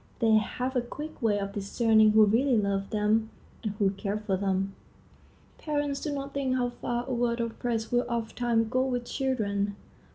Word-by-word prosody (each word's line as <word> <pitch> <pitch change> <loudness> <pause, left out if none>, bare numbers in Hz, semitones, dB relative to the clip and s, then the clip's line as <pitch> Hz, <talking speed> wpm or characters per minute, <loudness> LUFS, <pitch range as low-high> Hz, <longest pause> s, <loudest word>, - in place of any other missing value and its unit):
They 225 -2 +4
have 250 +4 -2
a 250 - +3
quick 295 +5 -8
way 210 -3 +2
of 200 0 -3
discerning 215 +1 +3
who 215 0 +7
really 240 +4 +3
love 200 -1 0
them 215 +1 +1 0.3
and 210 -3 -3
who 200 -2 +1
care 200 +1 -3
for 210 -2 -1
them. 195 0 -1 0.9
Parents 290 -2 -2
do 300 - -2
not 275 -1 -4
think 270 -2 0
how 245 -1 +1
far 240 0 -3
a 260 - -2
word 240 -1 0
of 230 -1 -3
praise 225 -2 -2
will 245 0 +2
ofttimes 230 -1 0
go 255 +1 +2
with 245 -2 -2
children. 205 -7 -1
230 Hz, 185 wpm, -28 LUFS, 210-250 Hz, 0.9 s, who